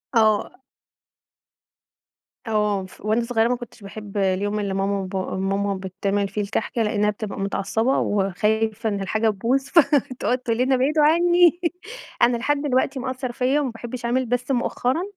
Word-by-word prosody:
آه. 220 Hz, +3 st, +2 dB, 1.8 s
آه، 210 Hz, -3 st, 0 dB
ف 185 Hz, -, -16 dB
وأنا 220 Hz, +2 st, +2 dB
صغيّرة 230 Hz, -1 st, +1 dB
ما 250 Hz, -, +1 dB
كُنتش 240 Hz, -2 st, -11 dB
باحب 205 Hz, 0 st, -8 dB
اليوم 200 Hz, +2 st, 0 dB
اللي 200 Hz, -2 st, -2 dB
ماما 195 Hz, +1 st, 0 dB
وبا 190 Hz, 0 st, -3 dB
ماما 195 Hz, +1 st, 0 dB
بتعمل 195 Hz, +1 st, -2 dB
فيه 205 Hz, +2 st, -3 dB
الكحك 205 Hz, +3 st, -3 dB
لأنها 210 Hz, -2 st, +1 dB
بتبقى 210 Hz, -1 st, -5 dB
متعصبة 200 Hz, +6 st, 0 dB
وخايفة 215 Hz, +3 st, 0 dB
إن 200 Hz, -1 st, -2 dB
الحاجة 220 Hz, +3 st, +1 dB
تبوظ، 235 Hz, +6 st, 0 dB
فتقعد 270 Hz, -6 st, +2 dB
تقول 235 Hz, -2 st, -2 dB
لنا: 260 Hz, +2 st, +2 dB
"ابعدوا 295 Hz, +4 st, +2 dB
عنّي"، 345 Hz, +2 st, +4 dB, 0.6 s
أنا 240 Hz, 0 st, +4 dB
لحد 285 Hz, +4 st, 0 dB
دلوقتي 270 Hz, -1 st, 0 dB
مأثر 255 Hz, 0 st, -4 dB
فيَّ 255 Hz, +4 st, +1 dB
وما 275 Hz, -4 st, -1 dB
باحبش 240 Hz, +1 st, -7 dB
أعمل، 255 Hz, +2 st, +1 dB
بس 245 Hz, +2 st, -1 dB
مؤخرًا 255 Hz, +4 st, 0 dB
225 Hz, 150 wpm, -23 LUFS, 200-255 Hz, 1.8 s, عنّي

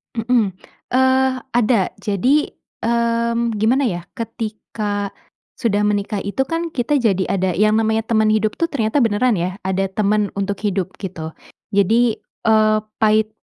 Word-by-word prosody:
Mmm. 225 Hz, -3 st, +1 dB, 0.4 s
Eee 260 Hz, +1 st, +3 dB, 0.2 s
ada, 230 Hz, -4 st, +3 dB, 0.2 s
jadi, 250 Hz, +10 st, +1 dB, 0.3 s
mmm, 235 Hz, 0 st, +1 dB
gimana 245 Hz, +6 st, +2 dB
ya, 175 Hz, -5 st, -3 dB
ketika 210 Hz, -2 st, -4 dB, 0.4 s
sudah 210 Hz, -4 st, +1 dB
menikah 205 Hz, 0 st, -1 dB
itu 200 Hz, +7 st, -1 dB
kan 330 Hz, +5 st, -2 dB
kita 275 Hz, +3 st, +1 dB
jadi 195 Hz, -6 st, +2 dB
ada 190 Hz, -1 st, +1 dB
yang 215 Hz, +2 st, +3 dB
namanya 220 Hz, 0 st, +1 dB
teman 220 Hz, -1 st, +2 dB
hidup 215 Hz, 0 st, +1 dB
tuh, 335 Hz, -, +2 dB
ternyata 260 Hz, -3 st, 0 dB
beneran 230 Hz, -2 st, +2 dB
ya, 180 Hz, +2 st, -2 dB
ada 190 Hz, +1 st, 0 dB
teman 205 Hz, +1 st, +1 dB
untuk 200 Hz, 0 st, -2 dB
hidup, 190 Hz, -2 st, -1 dB
gitu. 165 Hz, -5 st, -6 dB, 0.4 s
Jadi, 225 Hz, +4 st, +3 dB, 0.2 s
eee, 215 Hz, -1 st, +4 dB, 0.2 s
pahit 215 Hz, 0 st, +3 dB
215 Hz, 140 wpm, -20 LUFS, 200-235 Hz, 0.4 s, eee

